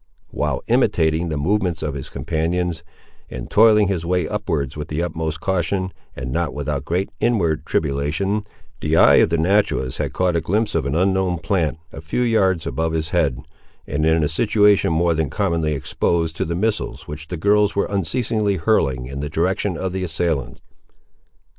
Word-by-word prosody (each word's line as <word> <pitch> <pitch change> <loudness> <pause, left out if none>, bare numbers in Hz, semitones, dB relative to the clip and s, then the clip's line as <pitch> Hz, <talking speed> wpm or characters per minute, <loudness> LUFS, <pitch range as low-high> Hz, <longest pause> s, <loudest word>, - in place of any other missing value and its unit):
While - - -2
imitating 80 +2 +2
the 75 - -2
movements 90 +2 0
of 75 - -2
his 70 -1 -6
companions, 80 +4 -2 0.5
and 60 -1 -7
toiling 105 -1 +6
his 90 -4 -1
way 90 -1 0
upward 80 -11 -2
with 75 0 -5
the 80 +3 -2
utmost 80 -2 -3
caution, 95 0 -1 0.2
and 65 0 -5
not - - -1
without 75 -1 -3
great 90 +5 -1
inward 90 -10 +1
tribulation, 80 +9 -1 0.3
the - - +1
eye - - +7
of - - +5
the 85 - +1
naturalist 85 -7 +1
had - - -1
caught 90 -2 0
a 85 - +1
glimpse 105 +6 0
of 80 -4 0
an 70 - -1
unknown 95 0 +1
plant, 80 -2 -1 0.2
a - - -8
few 80 +10 -2
yards 95 -8 +2
above 80 0 -1
his 80 -1 -1
head, 75 -8 0 0.4
and 70 +2 -2
in 80 0 +3
a - - +2
situation 105 +5 +3
more 85 +1 +2
than 80 -3 -1
commonly 85 -2 0
exposed 80 +4 -1
to - - -1
the 85 - -3
missiles 110 +4 -2
which 80 +1 -7
the 90 - -5
girls 105 +4 +2
were 100 - +2
unceasingly 100 +2 0
hurling 70 - +1
in 70 +2 -6
the 75 0 -3
direction 90 +3 0
of 95 +1 -2
the 95 0 -3
assailants. 80 -5 -2
85 Hz, 180 wpm, -21 LUFS, 80-95 Hz, 0.5 s, eye